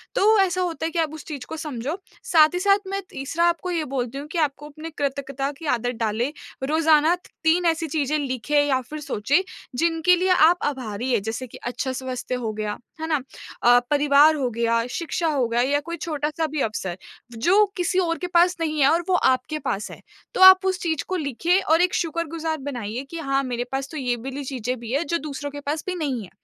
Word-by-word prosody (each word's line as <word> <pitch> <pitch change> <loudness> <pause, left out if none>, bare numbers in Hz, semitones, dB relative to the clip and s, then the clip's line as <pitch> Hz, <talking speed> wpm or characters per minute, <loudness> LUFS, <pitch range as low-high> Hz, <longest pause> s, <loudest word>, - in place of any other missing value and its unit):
तो 430 +1 +4
ऐसा 370 -1 +1
होता 330 -2 -2
है 330 - -2
कि 340 - -2
आप 315 -2 0
उस 315 - -9
चीज़ 280 -5 -6
को 320 - -6
समझो। 300 +1 -4 0.3
साथ 320 -9 +5
ही 360 - -1
साथ 395 +1 +4
मैं 395 0 -2
तीसरा 305 +6 -1
आपको 345 +1 -1
ये 330 -3 0
बोलती 255 -1 -2
हूँ 285 - -6
कि 330 +3 -6
आपको 295 -1 -1
अपनी 310 +2 -8
कृतज्ञता 275 -1 -2
की 325 - -8
आदत 245 +1 -1
डालें। 225 +5 0 0.3
रोजाना 315 +2 +4 0.3
3 340 +2 +3
ऐसी 330 -1 +1
चीज़ें 300 0 0
लिखें 280 +2 +1
या 265 -2 +2
फिर 305 0 -5
सोचें 280 - +1 0.4
जिनके 335 +1 +3
लिए 365 +2 0 0.2
आप 350 +1 +4
आभारी 250 -3 -3
हैं। 230 -4 +2
जैसे 230 +4 -4
कि - - -12
अच्छा 260 +2 -2
स्वस्थ्य 255 -1 -4
हो 230 -3 -3
गया, 210 -1 -3 0.2
है 320 - -2
ना? 305 -3 +1 0.4
अ, 245 0 +7
परिवार 295 +1 +5
हो 260 -4 -1
गया, 230 0 0
शिक्षा 335 +4 -2
हो 275 -6 +1
गया 235 +1 +1
या 280 +3 +2
कोई 335 +3 -6
छोटा-सा 310 0 -2
भी 300 -1 -3
अवसर, 190 -5 -3 0.4
जो 385 - +4
किसी 360 +1 +1
और 335 -2 0
के 360 - -4
पास 355 +1 +5
नहीं 310 -1 -1
है 270 - +6
और 330 +3 +3
वो 370 - +4
आपके 260 0 +1
पास 215 -6 -3
है। - - -11 0.3
तो - - -1
आप 375 0 +9
उस 375 -1 0
चीज़ 320 -4 -1
को 375 - -2
लिखिए 335 +4 +1
और 325 +2 +3
एक 360 0 +2
शुक्रगुज़ार 325 -1 -2
बनाइए 235 +1 -4
कि 335 - -5
हाँ, 275 -2 0
मेरे 245 -2 -2
पास 270 0 -3
तो 315 - -6
ये 250 -3 0
वाली 270 +4 -6
चीज़ें 255 -2 -3
भी 230 -1 -7
हैं 295 +5 +1
जो 335 - +1
दूसरों 290 -1 -6
के 290 - -7
पास 295 +2 -3
भी 365 - -2
नहीं 270 -9 -2
है। 180 - -12
295 Hz, 220 wpm, -23 LUFS, 255-330 Hz, 0.4 s, आप